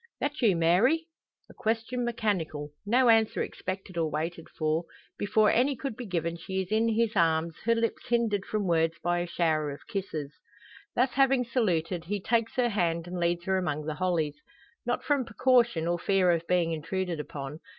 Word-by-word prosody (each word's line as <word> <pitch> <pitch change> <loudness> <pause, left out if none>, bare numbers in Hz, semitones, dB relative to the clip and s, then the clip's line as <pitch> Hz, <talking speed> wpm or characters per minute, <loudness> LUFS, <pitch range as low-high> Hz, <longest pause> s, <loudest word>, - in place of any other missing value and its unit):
"That 290 +1 -2
you, 215 -7 +4
Mary?" 190 - +3 0.4
A - - -15
question 230 +3 -1
mechanical; 185 -11 -2 0.2
no 250 +4 +4
answer 225 -1 +4
expected 185 -2 -5
or 160 -1 +1
waited 165 +2 -4
for. 155 +1 -1 0.3
Before 210 +1 +3
any 265 +4 +2
could 265 -2 -5
be 245 -1 -7
given 170 -2 -2
she 190 +3 -4
is 190 +1 -4
in 220 +1 +3
his 225 0 +1
arms, 165 -2 +2
her 230 0 +4
lips 230 0 -2
hindered 230 -4 +1
from 210 0 -2
words 165 -2 +2
by 175 0 +1
a 175 - -2
shower 160 -3 0
of 140 - -8
kisses. 155 -8 -4 0.6
Thus 255 +2 +2
having 270 -1 +3
saluted, 180 -8 0
he 205 +4 -2
takes 230 +3 0
her 245 -2 +2
hand 170 -5 0
and 180 0 -5
leads 170 0 0
her 190 0 +1
among 150 -4 -2
the 155 - -2
hollies. 160 -4 -1 0.5
Not - - 0
from 285 -3 +1
precaution, 235 -6 +2
or 175 0 0
fear 190 -1 +3
of 170 -1 -1
being 175 -2 +2
intruded 170 +2 -2
upon. 145 0 -6
185 Hz, 180 wpm, -28 LUFS, 165-230 Hz, 0.6 s, you